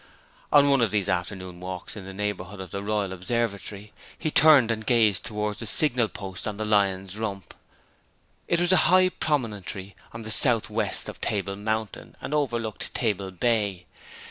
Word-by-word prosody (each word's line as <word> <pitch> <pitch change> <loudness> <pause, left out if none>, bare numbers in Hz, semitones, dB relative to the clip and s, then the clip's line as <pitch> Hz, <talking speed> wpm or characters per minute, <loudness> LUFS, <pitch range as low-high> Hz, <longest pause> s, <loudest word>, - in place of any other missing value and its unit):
On 145 -1 +7
one 140 -2 +4
of 115 - +3
these 100 -1 0
afternoon 95 -1 -3
walks 90 +1 -6
in 100 -3 -8
the 95 - -7
neighbourhood 100 -1 -4
of 95 -3 -8
the 100 - -4
Royal 100 -2 -1
Observatory 100 +1 -3 0.2
he 155 - -2
turned 145 -8 +6
and 110 -1 -2
gazed 110 -4 +3
towards 105 -1 -3
the 115 - -4
signal 120 +1 +2
post 95 -2 -7
on 105 -1 -4
the 110 - -2
Lion's 100 -1 +1
Rump. 100 -4 -4 1.0
This 170 - +3
was 175 +1 +2
a 185 - +6
high 185 0 +6
promontory 105 - -3 0.2
to 115 0 -8
the 110 0 -1
north 120 -5 +2
west - - +1
of - - -8
Table 100 -1 -1
Mountain, 110 +1 -4
and - - -5
overlooked 120 -7 -2
Table 100 -2 -1
Bay. 100 -1 0
105 Hz, 170 wpm, -26 LUFS, 95-115 Hz, 1.0 s, On